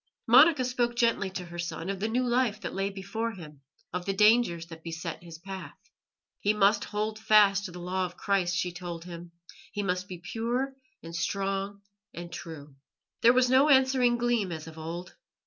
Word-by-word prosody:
Monica 260 +3 +7
spoke 245 -1 0
gently 230 -5 +2
to 185 -1 -6
her 175 0 -9
son 170 0 -4
of 195 -1 -3
the 215 - -1
new 245 +3 0
life 240 -3 +1
that - - -5
lay 195 +1 -1
before 200 +4 -4
him, 150 -7 -11 0.3
of 180 0 -2
the 195 - +1
dangers 210 -5 +4
that 165 -1 -11
beset 165 0 -6
his 170 -2 -10
path. 190 +2 -8 0.6
He 210 +1 +1
must 205 0 +3
hold 215 +1 -3
fast 210 -2 +5
to 185 - -6
the 175 - -9
Law 185 +1 -2
of 180 - -15
Christ, 190 -3 +1
she 180 0 -1
told 175 -1 -7
him; 170 -1 -9 0.4
he 205 - -3
must 180 0 -1
be 185 - -7
pure 230 +8 -2 0.3
and 165 0 -8
strong 195 +3 -2 0.3
and 175 0 -7
true. 150 -3 -8 0.5
There 235 - +7
was 250 0 +3
no 270 +3 +5
answering 260 -3 +4
gleam 235 -5 0
as 160 -2 -6
of 160 0 -10
old. 170 +3 -6
195 Hz, 190 wpm, -28 LUFS, 175-230 Hz, 0.6 s, Monica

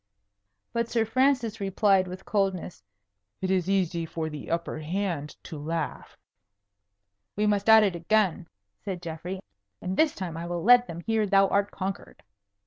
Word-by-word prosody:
But 235 -1 -1
Sir 225 -2 +1
Francis 250 -1 +1
replied 195 -1 +2
with 185 +1 -8
coldness, 195 - -1 0.6
"It 190 0 -1
is 185 -1 +1
easy 180 -3 +1
for 160 0 -4
the 150 -2 -8
upper 170 -1 -2
hand 165 -2 -3
to 155 -4 -8
laugh." 160 +1 -4 1.2
"We 210 - +1
must 205 0 +1
at 220 -1 +9
it 195 -4 +1
again," 180 -1 +1 0.4
said 190 -3 -4
Geoffrey; 170 +3 -5 0.4
"and 185 +1 -3
this 315 -2 +3
time 175 -4 -5
I 170 +1 -5
will 175 -1 -3
let 245 +2 +6
them 170 0 -7
hear 220 +2 0
thou 195 0 +5
art 200 0 +1
conquered." 195 0 -6
190 Hz, 155 wpm, -27 LUFS, 170-210 Hz, 1.2 s, at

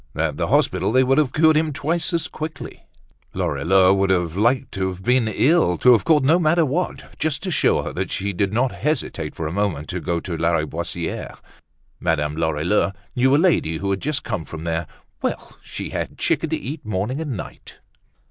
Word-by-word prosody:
At 80 -1 -1
the - - -1
hospital - - +2
they 130 +2 +4
would 135 +3 +3
have 145 -5 +1
cured 160 +2 +4
him 155 0 +2
twice 160 +6 -1
as 170 -2 0
quickly. 155 0 -7 0.5
Lorilleux 95 +1 +3
would 100 0 +1
have 90 -3 +1
liked 120 +5 +1
to 95 -1 -2
have 95 0 -6
been 125 +1 +2
ill, 130 - +3
to 125 - +5
have 110 -5 +4
caught 150 -4 +4
no 160 +6 +4
matter 165 0 +3
what, 165 +6 -3
just 155 +1 -1
to 190 - -2
show - - +2
her - - -5
that - - -3
he 100 +1 -2
did 95 +2 0
not 120 +3 +1
hesitate 130 - -2
for 80 - -4
a 75 - -2
moment 90 -6 -1
to 90 - -3
go 85 -1 -1
to 85 0 -5
Lariboisiere. 85 +1 -2 0.6
Madame 75 -3 0
Lorilleux 80 +5 +1 0.2
knew 130 +2 +4
a - - +5
lady 155 - +2
who 100 +4 -2
had 95 - -1
just 150 0 -1
come 105 -8 -3
from 80 0 -8
there. 80 -1 -2 0.3
Well! - - -4
She - - -7
had - - -2
had - - -22
chicken - - 0
to - - 0
eat 145 +7 -6
morning 110 +7 -2
and 140 -9 -3
night. - - -10
105 Hz, 205 wpm, -22 LUFS, -, 0.6 s, to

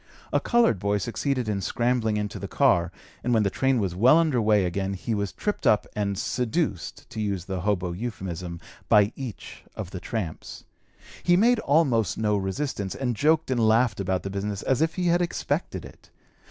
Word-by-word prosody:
A - - +4
colored 235 - +3
boy 100 +1 +1
succeeded 125 +4 -2
in 100 -2 -1
scrambling 120 +1 0
into 105 -1 -3
the - - -5
car, 85 0 +2 0.3
and 125 -1 +1
when 110 - +3
the 100 - 0
train 130 +1 +1
was 95 -5 -1
well 125 - +5
under 155 -8 +2
way 105 -3 +3
again 95 +2 -2
he 115 +5 -3
was 100 -2 -1
tripped 210 - -2
up 105 - +4
and 100 -2 -1
"seduced" 125 - -2
(to 110 - -4
use 100 -4 -2
the 95 -2 -3
hobo 95 -2 0
euphemism) 90 -4 -5 0.3
by 105 0 +5
each 130 -6 -8
of 95 -4 -6
the 90 - -5
tramps. 95 -4 -5 0.6
He 175 0 +4
made 235 +4 +4
almost 135 - +2
no 105 -1 +1
resistance, 100 +1 -2
and 125 -3 -2
joked 155 +3 +2
and 125 - +1
laughed 110 -1 +3
about 95 -1 -1
the 95 - -4
business 100 +1 -3
as 135 +2 +1
if 160 0 +1
he 180 - -1
had 175 0 +3
expected 175 - -2
it. - - -15
110 Hz, 190 wpm, -26 LUFS, 95-130 Hz, 0.6 s, well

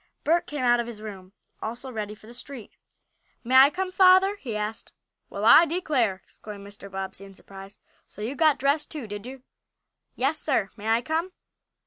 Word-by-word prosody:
Bert 335 +3 +2
came 290 -3 -4
out 240 -1 +4
of 235 - -2
his 230 -3 -8
room, 195 -4 -9 0.3
also 240 +4 -6
ready 210 -2 -5
for 215 - -19
the 235 - -12
street. 250 -2 -10 0.7
"May 250 +2 -3
I 270 +2 +9
come, 370 +3 -4
father?" 375 +1 +5
he 240 - -6
asked. 210 +1 -5 0.4
"Well, - - -4
I 335 - +8
declare!" 275 - 0
exclaimed 205 -2 -11
Mr. 200 0 -12
Bobbsey, 190 0 -6
in 195 -1 -13
surprise. 195 +1 -13 0.3
"So 210 - -10
you 235 +5 -3
got 305 +1 +3
dressed 285 +3 0
too, 300 -6 -6
did 205 +2 -7
you?" 260 0 -10 0.7
"Yes, 275 +5 0
sir. 225 -9 0
May 215 0 -8
I 225 +2 +2
come?" 325 +6 -2
240 Hz, 185 wpm, -25 LUFS, 210-295 Hz, 0.7 s, I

